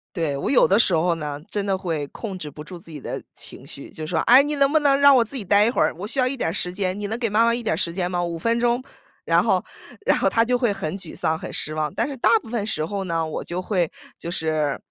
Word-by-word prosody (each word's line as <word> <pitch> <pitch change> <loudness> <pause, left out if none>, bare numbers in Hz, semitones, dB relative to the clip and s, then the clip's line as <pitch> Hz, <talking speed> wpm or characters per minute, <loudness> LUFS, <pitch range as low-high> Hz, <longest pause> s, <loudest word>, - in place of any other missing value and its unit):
对， 160 -5 -1
我 140 - -2
有 270 - +5
的 200 +3 +4
时 190 - +3
候 170 +2 +2
呢， 150 -3 -5
真 205 - -1
的 195 -1 0
会 165 -6 -3
控 195 +4 -7
制 155 -5 -6
不 150 +1 -10
住 180 +3 -9
自 165 - -13
己 155 -2 -8
的 - - -5
情 - - -7
绪 - - -11
就 155 -1 -7
说： 160 0 0
“哎 250 +3 +8
你 295 +1 -1
能 275 0 +3
不 315 - +4
能 280 -2 +3
让 280 -1 +7
我 245 - +5
自 230 +5 -8
己 230 - -4
呆 200 +2 +5
一 - - +3
会 240 - +2
儿， - - +1
我 200 - -4
需 250 - -7
要 255 -1 +3
一 265 - -2
点 240 - -1
儿 - - -4
时 180 -2 -1
间， 190 0 -2
你 205 - -3
能 220 +2 -3
给 230 -2 0
妈 215 +3 +3
妈 235 - +3
一 240 - -2
点 225 - 0
儿 - - -2
时 170 -1 -1
间 180 0 -1
吗？ 175 -1 -1
5 170 -1 -3
分 230 +7 0
钟。 240 +1 +1 0.4
“然 - - +3
后 - - +2 0.4
然 - - +3
后， - - +1
她 230 - +3
就 245 +2 +1
会 240 -4 +1
很 170 -1 -4
沮 180 -5 -7
丧、 160 0 0
很 - - -8
失 155 - -2
望， 155 -1 -2
但 - - 0
是 275 - -6
大 - - +3
部 - - -13
分 225 -3 -2
时 155 -8 -2
候 195 +4 -3
呢， 165 -3 -1
我 155 - -4
就 175 +2 -4
会， 180 -4 0 0.3
就 170 - -6
是， 155 -4 -1
190 Hz, 325 characters per minute, -23 LUFS, 165-235 Hz, 0.4 s, 哎